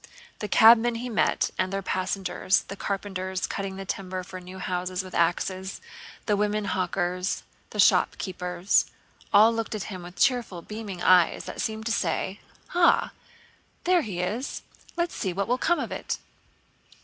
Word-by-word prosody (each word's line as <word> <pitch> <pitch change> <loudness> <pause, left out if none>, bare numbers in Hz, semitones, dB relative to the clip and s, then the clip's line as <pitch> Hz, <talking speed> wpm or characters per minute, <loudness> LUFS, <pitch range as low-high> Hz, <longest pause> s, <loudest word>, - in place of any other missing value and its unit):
The 210 - -3
cabmen 230 +2 +6
he 245 +2 -4
met 220 - +1
and 185 0 +1
their 195 0 -2
passengers, 185 0 0
the 195 - -8
carpenters 190 -2 -3
cutting 195 -1 -4
the 195 0 -6
timber 185 -1 -4
for 185 0 -9
new 180 +1 -10
houses 185 0 -2
with 185 - -11
axes, 185 +2 0 0.5
the 210 - +2
women 210 +1 0
hawkers, 180 0 -1
and - - -35
the - - -6
shopkeepers, 180 0 +2 0.4
all 215 +3 +7
looked 225 -1 -3
at 210 - -3
him 185 - -6
with 175 +1 -10
cheerful 240 -10 +1
beaming 210 -4 -6
eyes 180 -2 +4
that - - -5
seemed 220 0 -3
to 230 - -1
say: 190 -1 -1 0.3
"Ah, 350 -1 +4 0.7
there 360 -1 +4
he 195 - -4
is! 215 +9 -3 0.3
Let's 345 0 0
see 190 -5 -2
what 200 +2 -1
will 250 +2 +1
come 345 - +2
of - - -4
it!" - - -3
195 Hz, 160 wpm, -26 LUFS, 185-220 Hz, 0.7 s, all